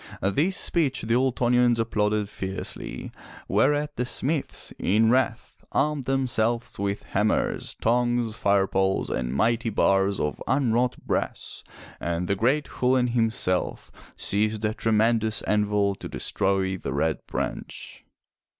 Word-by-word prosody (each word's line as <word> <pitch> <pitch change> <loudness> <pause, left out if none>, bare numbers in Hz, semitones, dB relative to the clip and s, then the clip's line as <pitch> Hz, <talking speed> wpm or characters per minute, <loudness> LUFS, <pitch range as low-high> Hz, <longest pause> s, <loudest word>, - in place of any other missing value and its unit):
This 145 - +1
speech 140 -7 0
the 115 +1 0
Ultonians 125 -1 +3
applauded 105 -2 0
fiercely, 95 -1 -5 0.4
whereat 145 +8 +1
the 125 - 0
smiths, 145 +3 -1
in 110 +4 +3
wrath, 130 0 -1
armed 150 -2 +1
themselves 120 -4 0
with 100 0 -2
hammers, 105 +2 0
tongs, 120 -1 +1
fire 100 -2 +2
poles 95 0 0
and 60 -1 -2
mighty 115 - +1
bars 100 -1 +2
of 75 - -2
unwrought 125 -2 +1
brass, - - -3 0.4
and 85 +1 -2
the 100 - +2
great 130 +9 +1
Chulain 125 -1 +3
himself 115 -6 -1 0.2
seized 110 +1 0
a 105 - 0
tremendous 110 0 +1
anvil 105 -1 +1
to - - -8
destroy 95 -1 0
the 70 - -5
Red 80 +2 0
Branch. - - -5
110 Hz, 125 wpm, -25 LUFS, 100-125 Hz, 0.4 s, Ultonians